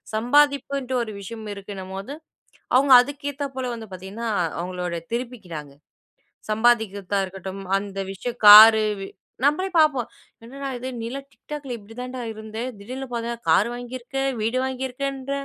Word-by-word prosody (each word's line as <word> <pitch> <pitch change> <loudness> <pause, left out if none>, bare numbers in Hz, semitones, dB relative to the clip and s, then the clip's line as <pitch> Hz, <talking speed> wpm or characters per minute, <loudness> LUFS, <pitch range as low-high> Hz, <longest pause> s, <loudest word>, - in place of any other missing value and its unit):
சம்பாதிப்புன்ட்டு 275 +2 +2
ஒரு 215 -2 -7
விஷயம் 215 +2 -8
இருக்குன்னம்போது, 195 +4 -7 0.6
அவுங்க 265 +1 +6
அதுக்கேத்தாப் 285 0 -5
போல 260 - -2
வந்து 225 -1 -9
பாத்தீங்கன்னா, 195 +6 -6
அ - - +2 0.2
அவுங்களோட 180 -1 -4 0.2
திருப்பிக்கிறாங்க. 190 - -6 0.8
சம்பாதிக்கிற்தா 215 -4 +2
இருக்கட்டும் 190 +1 -8 0.2
அந்த 195 0 -6
விஷயம் 240 +5 -6
காரு, 220 +1 +11 0.2
வீ 195 - -6 0.4
நம்பளே 305 +7 +2
பாப்போம். 300 -7 +4 0.4
"என்னடா! 275 +4 -7
இது 255 +2 -5
நீலாம் 265 +4 -5
TikTok 300 -1 -8
ல - - -5
இப்பிடி 220 +1 -14
தான்டா 255 +1 -5
இருந்த! 220 0 -9 0.2
திடீர்னு 255 +6 -7
பாத்தன்னா, 235 0 -3
கார் 195 +8 +5
வாங்கியிருக்க! 245 +2 -7 0.2
வீடு 230 +4 0
வாங்கியிருக்கேன்ற!" 265 +1 -4
235 Hz, 130 wpm, -23 LUFS, 200-265 Hz, 0.8 s, காரு